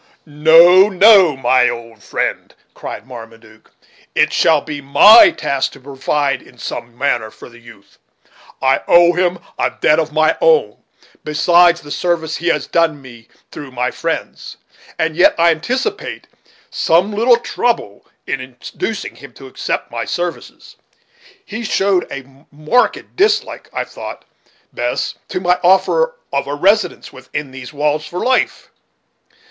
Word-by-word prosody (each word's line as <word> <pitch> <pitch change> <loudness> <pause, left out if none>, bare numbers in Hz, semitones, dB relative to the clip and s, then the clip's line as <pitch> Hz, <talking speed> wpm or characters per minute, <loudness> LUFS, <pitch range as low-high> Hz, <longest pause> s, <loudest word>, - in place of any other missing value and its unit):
"No, 165 +6 +5
no, 190 -6 +5
my 125 -1 +2
old 115 -2 -9
friend," - - -4 0.2
cried 100 - -8
Marmaduke, 115 -3 -14 0.5
"it - - +2
shall 160 -2 +3
be 145 0 -7
my 205 +11 +7
task 140 -3 -3
to - - -14
provide 140 +1 -2
in 125 - -20
some 120 0 -7
manner 120 -5 -1
for - - -14
the 120 0 -17
youth; 115 -4 -18 0.6
I 130 0 +2
owe 175 0 +5
him 180 0 0 0.2
a - - +1
debt 155 +1 +3
of 155 -1 -2
my 155 +1 +1
own, - - +2 0.5
besides 175 +3 +3
the 145 - -12
service 165 -2 -2
he 175 - -5
has 170 - 0
done 165 -3 0
me 120 -4 -15 0.2
through 145 - -9
my 125 0 -2
friends. - - -5 0.4
And 160 -1 -1
yet 175 - +4
I 170 0 +4
anticipate 240 +12 -4 0.5
some 175 +6 +1
little 235 +3 +3
trouble 235 - -3 0.2
in 130 - -3
inducing 130 - -7
him 140 -3 -14
to 135 - -14
accept 130 - -4
of - - -34
my - - -4
services. 175 -1 -6 0.7
He 220 +3 -7
showed 195 -3 0
a 135 +1 -11
marked 155 +12 -1
dislike, 425 +3 0
I - - -3
thought, - - -10 0.5
Bess, - - -3
to - - -4
my 180 0 +1
offer 190 - +2 0.2
of 140 0 -1
a 145 - -3
residence 195 +3 0
within 130 +2 -7
these 125 -2 -10
walls 150 +1 -2
for 180 - -5
life." 255 0 -1
155 Hz, 145 wpm, -16 LUFS, 130-180 Hz, 0.7 s, my